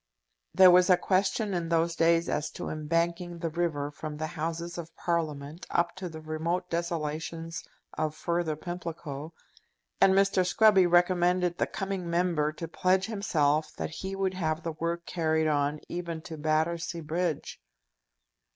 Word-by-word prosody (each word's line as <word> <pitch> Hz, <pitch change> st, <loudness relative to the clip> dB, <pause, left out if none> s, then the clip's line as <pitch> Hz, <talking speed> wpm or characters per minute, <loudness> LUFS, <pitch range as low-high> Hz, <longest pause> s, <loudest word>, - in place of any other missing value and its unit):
There 185 Hz, -1 st, +9 dB
was 180 Hz, +1 st, +6 dB
a 180 Hz, -, +7 dB
question 195 Hz, +3 st, +1 dB
in 170 Hz, -2 st, -2 dB
those 165 Hz, 0 st, +1 dB
days 165 Hz, +1 st, +3 dB
as 150 Hz, +1 st, -1 dB
to -, -, -5 dB
embanking 170 Hz, +3 st, -1 dB
the 165 Hz, -1 st, -2 dB
river 155 Hz, -4 st, -1 dB
from 150 Hz, 0 st, -6 dB
the 155 Hz, -, -2 dB
Houses 170 Hz, +2 st, -4 dB
of 165 Hz, 0 st, -8 dB
Parliament 155 Hz, -2 st, -3 dB
up 170 Hz, 0 st, +1 dB
to 185 Hz, -1 st, -5 dB
the 160 Hz, -1 st, -8 dB
remote 165 Hz, +3 st, -2 dB
desolations 165 Hz, 0 st, -3 dB, 0.3 s
of 155 Hz, -1 st, -1 dB
further 170 Hz, -2 st, -1 dB
Pimlico, 165 Hz, -3 st, -6 dB, 0.7 s
and 190 Hz, -, +6 dB
Mr. 195 Hz, -1 st, +4 dB
Scruby 190 Hz, -1 st, +5 dB
recommended 175 Hz, 0 st, +3 dB
the -, -, +2 dB
coming 195 Hz, -3 st, -4 dB
Member 170 Hz, -3 st, +1 dB
to 165 Hz, +2 st, -6 dB
pledge 185 Hz, +3 st, +2 dB
himself 155 Hz, -8 st, 0 dB
that -, -, -4 dB
he 190 Hz, +4 st, -5 dB
would 195 Hz, -1 st, 0 dB
have 160 Hz, -3 st, -2 dB
the 165 Hz, -, -2 dB
work 170 Hz, +2 st, -3 dB
carried 160 Hz, -2 st, 0 dB
on 145 Hz, 0 st, +1 dB
even 170 Hz, -2 st, -5 dB
to 165 Hz, -, -7 dB
Battersea 160 Hz, +2 st, -1 dB
Bridge. 165 Hz, -, -2 dB
170 Hz, 150 wpm, -29 LUFS, 155-180 Hz, 0.7 s, There